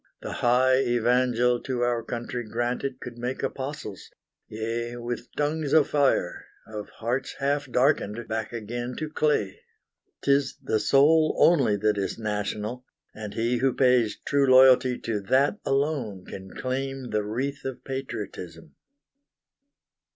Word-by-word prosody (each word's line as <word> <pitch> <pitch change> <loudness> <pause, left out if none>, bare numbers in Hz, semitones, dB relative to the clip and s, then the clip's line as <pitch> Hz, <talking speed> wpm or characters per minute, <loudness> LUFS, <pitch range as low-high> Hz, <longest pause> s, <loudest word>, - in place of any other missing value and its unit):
The - - -5
high 130 +2 +3
evangel 125 0 +2
to 130 -3 -3
our 120 -1 +1
country 120 +1 -4
granted 120 +4 -3
Could 120 -1 -9
make 125 +3 -3
apostles, 135 - -5 0.4
yea, 115 +2 -4
with 120 0 -5
tongues 150 0 -1
of 155 -3 +5
fire, 140 -11 +1 0.2
Of 105 -1 -7
hearts 125 +4 -3
half 140 +1 -1
darkened 120 -4 +1
back 110 -1 -3
again 120 +2 -5
to 155 -1 -4
clay! 145 -12 0 0.6
'Tis 140 0 +2
the 130 -5 0
soul 150 +8 +4
only 135 -11 +4
that 105 0 +1
is 95 - -2
national, 105 +2 -3 0.3
And 105 -1 -7
he 120 +2 +1
who 130 +1 +1
pays 125 -5 +3
true 140 -1 +2
loyalty 130 -1 +6
to 110 -3 -2
that 135 - +2
Alone 135 -9 -1
can 95 0 -9
claim 135 0 -3
the 105 -1 0
wreath 135 +7 -3
of 135 -2 -6
patriotism. 105 -11 -6
125 Hz, 135 wpm, -26 LUFS, 110-135 Hz, 0.6 s, loyalty